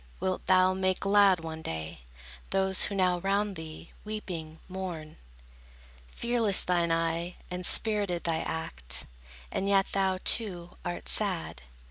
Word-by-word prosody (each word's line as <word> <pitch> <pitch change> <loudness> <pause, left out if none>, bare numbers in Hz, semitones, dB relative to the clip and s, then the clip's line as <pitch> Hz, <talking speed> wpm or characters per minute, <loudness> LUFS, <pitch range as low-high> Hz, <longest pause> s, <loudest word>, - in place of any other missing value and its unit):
Wilt 185 0 -2
thou 185 0 +5
make 185 0 0
glad 195 -3 +5
one 160 -1 -6
day, 80 - -5 0.5
Those, 190 -1 +1
who 200 - -4
now 180 -2 +2
round 200 +2 0
thee, 160 0 -9
weeping, 175 -7 -6
mourn? 180 -5 -6 0.9
Fearless 230 - +3
thine 175 -2 +1
eye, 165 +1 -1 0.2
and 180 0 -4
spirited 200 -3 +3
thy 165 -1 0
act; 65 - -3 0.5
And 195 - -1
yet 195 -1 +4
thou, 190 -1 +1
too, 180 -6 +1
art 175 0 -5
sad. 185 - +1
180 Hz, 130 wpm, -29 LUFS, 165-195 Hz, 0.9 s, thou